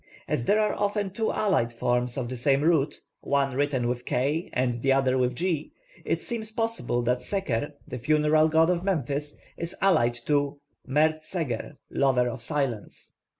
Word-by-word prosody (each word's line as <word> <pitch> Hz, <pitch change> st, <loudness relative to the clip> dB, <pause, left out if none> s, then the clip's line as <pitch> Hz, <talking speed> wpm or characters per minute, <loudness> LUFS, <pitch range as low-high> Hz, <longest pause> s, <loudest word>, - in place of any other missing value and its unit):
As 120 Hz, -, -1 dB
there 210 Hz, -, +3 dB
are 210 Hz, -1 st, +2 dB
often 205 Hz, -1 st, -1 dB
two 220 Hz, +3 st, -1 dB
allied 185 Hz, -, +1 dB
forms 120 Hz, +1 st, 0 dB
of 130 Hz, -3 st, -2 dB
the 130 Hz, -, -4 dB
same 135 Hz, +3 st, +2 dB
root, 155 Hz, -3 st, +2 dB, 0.2 s
one 140 Hz, -1 st, 0 dB
written 135 Hz, -3 st, +1 dB
with 120 Hz, 0 st, -2 dB
k 145 Hz, +8 st, -1 dB
and 125 Hz, -2 st, 0 dB
the 135 Hz, -, +2 dB
other 135 Hz, -1 st, +3 dB
with 125 Hz, -1 st, +1 dB
g, 165 Hz, -1 st, -2 dB, 0.3 s
it -, -, -1 dB
seems 220 Hz, -3 st, -4 dB
probable 225 Hz, -, -1 dB
that 125 Hz, +1 st, +1 dB
Seker, 145 Hz, -, -2 dB
the 125 Hz, -, -5 dB
funeral 155 Hz, +3 st, +3 dB
god 160 Hz, +2 st, +4 dB
of 175 Hz, 0 st, -1 dB
Memphis, 150 Hz, -5 st, -1 dB, 0.2 s
is 170 Hz, +1 st, -4 dB
allied 120 Hz, -12 st, +3 dB
to 145 Hz, -1 st, +1 dB, 0.3 s
+Mert 155 Hz, +3 st, +2 dB
Seger+ 155 Hz, -7 st, -4 dB, 0.2 s
(lover 130 Hz, -3 st, +2 dB
of 120 Hz, 0 st, -5 dB
silence). 135 Hz, -5 st, -3 dB
145 Hz, 170 wpm, -27 LUFS, 125-170 Hz, 0.3 s, god